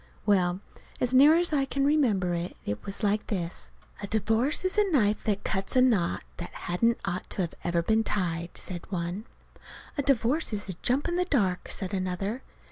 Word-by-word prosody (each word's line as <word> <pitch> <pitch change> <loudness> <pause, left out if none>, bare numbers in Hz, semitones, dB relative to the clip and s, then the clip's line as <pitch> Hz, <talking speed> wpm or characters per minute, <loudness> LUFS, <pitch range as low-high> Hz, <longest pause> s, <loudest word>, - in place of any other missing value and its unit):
Well, 185 -3 +2 0.4
as 250 0 0
near 285 +5 +7
as 345 -2 +1
I 275 -2 +2
can 275 0 -1
remember 225 -12 +2
it 170 +1 -3 0.3
was 200 +3 -5
like 210 +1 +1
this: 175 -4 -4 0.3
"A 200 - -4
divorce 225 - +1
is 370 - 0
a 415 -2 +3
knife 215 -8 +2
that 205 -2 0
cuts 195 +4 -1
a 255 - +6
knot 210 -9 +2
that 175 - -6 0.2
hadn't 230 +7 +2
ought 185 -1 -3
to 185 -3 +1 0.2
ever 170 -1 0
been 220 +4 +2
tied," 170 -5 -2
said 175 +1 -7
one. 180 +3 -3 0.7
"A - - +4
divorce 275 +1 +1
is 205 -1 -3
a 190 - -3
jump 265 +6 +2
in 345 0 -1
the 360 - +1
dark," 200 - 0
said 190 -2 -2
another. 195 +5 -2
210 Hz, 185 wpm, -28 LUFS, 185-260 Hz, 0.7 s, near